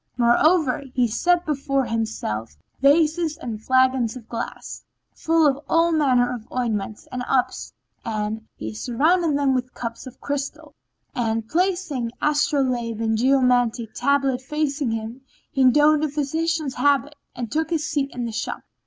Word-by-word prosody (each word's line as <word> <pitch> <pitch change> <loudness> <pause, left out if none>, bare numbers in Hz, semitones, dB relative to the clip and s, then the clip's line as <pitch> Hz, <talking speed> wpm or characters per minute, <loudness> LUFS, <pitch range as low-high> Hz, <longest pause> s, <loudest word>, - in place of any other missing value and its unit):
Moreover, 270 +4 +3
he 250 -2 +3
set 350 +10 +1
before 275 -2 0
himself 215 - -3 0.2
vases 310 +2 +3
and 220 -3 -6
flagons 260 -2 +2
of 235 -3 -10
glass 235 0 -6 0.3
full 325 -1 +2
of 280 -2 +2
all 335 +1 +3
manner 255 -6 +2
of 235 -2 -9
ointments 220 -4 -3
and 250 - -4
ups, 260 -2 0 0.3
and 220 0 -3
he 110 0 -6
surrounded 300 - +1
them 280 -2 +2
with 255 0 -3
cups 230 +2 -6
of 255 - -12
crystal—and, 240 -5 -5
placing 340 -6 -1
astrolabe 260 -6 0
and 225 -1 +1
geomantic 245 -2 +2
tablet 275 -2 +1
facing 285 -1 -1
him, 225 +3 -4 0.3
he 260 -1 +4
donned 300 +3 +4
a 310 - +1
physician's 305 +1 -1
habit 285 +2 +2 0.2
and 240 -3 -5
took 315 +1 0
his 325 -3 -1
seat 280 -2 -1
in 245 -1 -4
the 230 - -4
shop. 220 - -4
260 Hz, 145 wpm, -23 LUFS, 235-300 Hz, 0.3 s, he